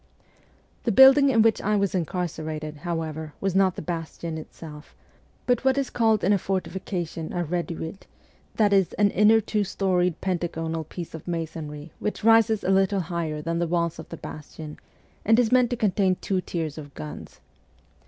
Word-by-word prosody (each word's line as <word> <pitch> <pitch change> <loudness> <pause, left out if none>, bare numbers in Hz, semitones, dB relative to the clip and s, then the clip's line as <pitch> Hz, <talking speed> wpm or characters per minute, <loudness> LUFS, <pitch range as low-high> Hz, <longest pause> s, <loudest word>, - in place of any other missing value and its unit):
The 235 - 0
building 270 +5 +8
in 225 -4 +4
which 225 -1 +3
I 210 +1 +1
was 200 -2 +1
incarcerated, 160 -4 -3
however, 160 -1 -4
was 195 -2 -1
not 190 -1 +3
the - - -6
bastion 165 0 -5
itself, 155 -1 -11 0.5
but 245 0 +1
what 265 0 +3
is 275 -2 -1
called 220 -3 +2
in 195 +4 +4
a 200 - +2
fortification 185 -3 -3
a 175 -1 -1
reduit; 170 +1 -4 0.5
that 210 -2 +3
is, 195 -3 +3
an 205 -1 +2
inner 215 +2 +5
two 210 -1 -1
storied 180 -3 0
pentagonal 165 -3 -2
piece 170 +2 -8
of 160 +1 -9
masonry 160 -2 -5
which 210 - -3
rises 225 -1 +4
a 190 - +1
little 195 0 +3
higher 155 -3 -2
than 165 +1 -1
the 170 - 0
walls 170 -1 -1
of 160 - -9
the 165 - -7
bastion, 150 0 -9 0.4
and 225 +2 +4
is 240 -3 +3
meant 250 -1 +4
to 245 - -2
contain 195 -3 +2
two 185 0 -2
tiers 160 -4 -4
of 145 -2 -11
guns. 75 -1 -9
180 Hz, 175 wpm, -25 LUFS, 160-205 Hz, 0.5 s, building